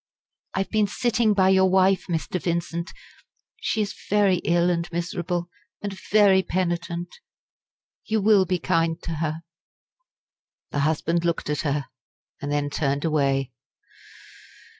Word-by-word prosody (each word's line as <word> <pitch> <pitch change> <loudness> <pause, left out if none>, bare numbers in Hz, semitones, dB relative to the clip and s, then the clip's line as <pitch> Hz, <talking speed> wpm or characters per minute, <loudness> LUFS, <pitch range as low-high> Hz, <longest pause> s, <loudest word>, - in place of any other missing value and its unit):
"I 190 - +1
have 195 - -5
been 215 -2 +2
sitting 225 0 +1
by 190 -1 +4
your 190 0 +5
wife, 190 0 +3
Mr. 170 +1 -2
Vincent. 170 0 -2 0.7
She 220 - 0
is 205 - -4 0.2
very 200 -2 +4
ill 175 +1 +2
and 170 0 -2
miserable, 175 0 -3 0.3
and 205 -1 -5
very 200 -2 +5
penitent. 175 - -3 0.9
You 220 0 0
will 205 -2 +5
be 185 - +1
kind 165 -1 0
to 165 - -4
her?" 160 +1 -3 1.3
The 145 - -1
husband 160 +3 +1
looked 170 -3 -1
at 150 - -1
her, 145 -2 -1 0.6
and 145 0 -3
then 145 0 -1
turned 145 0 -1
away. 135 -4 +1
175 Hz, 135 wpm, -24 LUFS, 160-190 Hz, 1.3 s, your